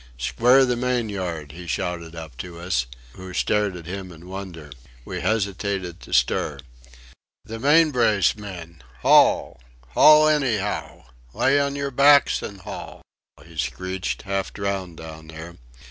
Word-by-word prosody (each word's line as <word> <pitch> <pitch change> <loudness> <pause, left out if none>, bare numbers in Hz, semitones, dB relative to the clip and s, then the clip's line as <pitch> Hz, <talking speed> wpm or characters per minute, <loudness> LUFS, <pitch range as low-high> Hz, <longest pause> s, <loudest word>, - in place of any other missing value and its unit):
"Square 125 - +4
the 125 -1 0
main 125 -2 -1
yard!" 85 -7 -4
he 85 +3 -10
shouted 85 -2 -3
up 80 -5 -9
to 85 +1 -8
us 75 -9 -1 0.3
who 95 0 -10
stared 105 -3 +1
at 85 -2 -9
him 95 +1 -6
in 85 +1 -13
wonder. 90 -6 -8 0.3
We - - -5
hesitated 100 -4 -2
to - - -14
stir. 75 - +1 0.9
"The 115 +1 -7
main 155 +5 +5
brace, 110 -7 +3
men. 90 -6 -9 0.2
Haul! - - +4 0.3
haul 155 - +7
anyhow! 120 - -1 0.3
Lay 135 +2 +3
on 140 0 0
your 140 -1 -3
backs 140 +1 +5
and 100 -2 -8
haul!" - - -9 0.4
he 85 -1 -15
screeched, 95 +9 -3
half 100 -1 -2
drowned 95 -4 -4
down 80 0 -10
there. 80 +2 -10
95 Hz, 145 wpm, -23 LUFS, 85-115 Hz, 0.9 s, haul